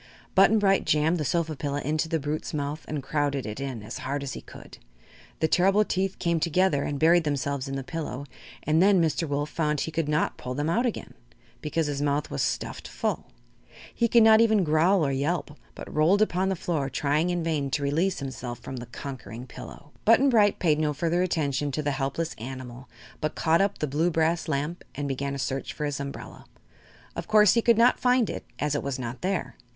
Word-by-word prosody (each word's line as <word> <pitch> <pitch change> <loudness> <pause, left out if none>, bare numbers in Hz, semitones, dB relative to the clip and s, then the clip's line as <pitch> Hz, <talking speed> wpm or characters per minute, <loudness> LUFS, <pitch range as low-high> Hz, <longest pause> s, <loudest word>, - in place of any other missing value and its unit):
Button 195 +3 +5
Bright 195 -2 +3
jammed 160 +3 +2
the - - -1
sofa 160 +3 -1
pillow 145 0 -3
into 155 +3 -1
the 165 -1 0
brute's 150 +2 -3
mouth 145 +1 -3
and 150 -3 -4
crowded 140 -1 -1
it 105 +3 -5
in 130 -6 -5
as 110 +3 -7
hard 140 +2 -3
as 140 - -4
he - - -7
could. - - -13 0.6
The 160 - +4
terrible 195 +5 +3
teeth 190 0 -1
came 170 -2 0
together 170 -2 +2
and 145 - -2
buried 165 +3 +4
themselves 140 -2 -2
in 135 - -4
the 135 - -3
pillow, 145 -3 -5 0.4
and 155 +2 +2
then 195 0 +5
Mr. 165 0 +1
Wolf 145 +1 -2
found 150 -3 0
he 160 - -3
could 160 -1 -1
not 150 0 0
pull 125 0 -5
them 145 +3 -1
out 240 +7 +2
again 230 - -5 0.5
because 155 +2 -1
his 145 -1 -2
mouth 145 0 0
was 70 - -2
stuffed - - -3
full. - - -3 0.7
He 235 - +1
could 235 0 +5
not 220 0 +7
even 220 -3 +4
growl 160 +3 +3
or 140 - 0
yelp, 145 +5 -1 0.2
but - - -9
rolled 175 +8 +4
upon 190 -2 0
the 190 - 0
floor 160 -5 -2
trying 150 +6 0
in 175 -1 -1
vain 155 -4 -1
to 145 +1 -1
release 165 +7 +1
himself 130 -3 -5
from 130 - -8
the 120 -1 -7
conquering 120 -2 -8
pillow. 145 +3 -11
Button 255 +5 +5
Bright 210 -4 +4
paid 155 -4 +2
no 150 -1 +1
further 170 +4 0
attention 145 -5 0
to 150 - -2
the 145 - 0
helpless 140 +4 -2
animal 125 +1 -8 0.3
but 155 - -2
caught 165 +1 +3
up 200 0 0
the - - -1
blue 150 +5 +1
brass 165 +1 0
lamp 155 +3 -2
and 145 0 -3
began 140 +1 -3
a - - -4
search 135 0 -3
for 150 - -3
his 145 -1 -3
umbrella. 140 0 -7 0.7
Of - - -5
course 210 -2 +6
he 230 - +3
could 235 -1 +4
not 240 +2 +4
find 250 -2 +2
it, - - -6
as 150 0 -1
it 145 - 0
was 140 -2 -3
not 120 -1 -6
there. 190 0 -2
150 Hz, 215 wpm, -26 LUFS, 140-175 Hz, 0.7 s, not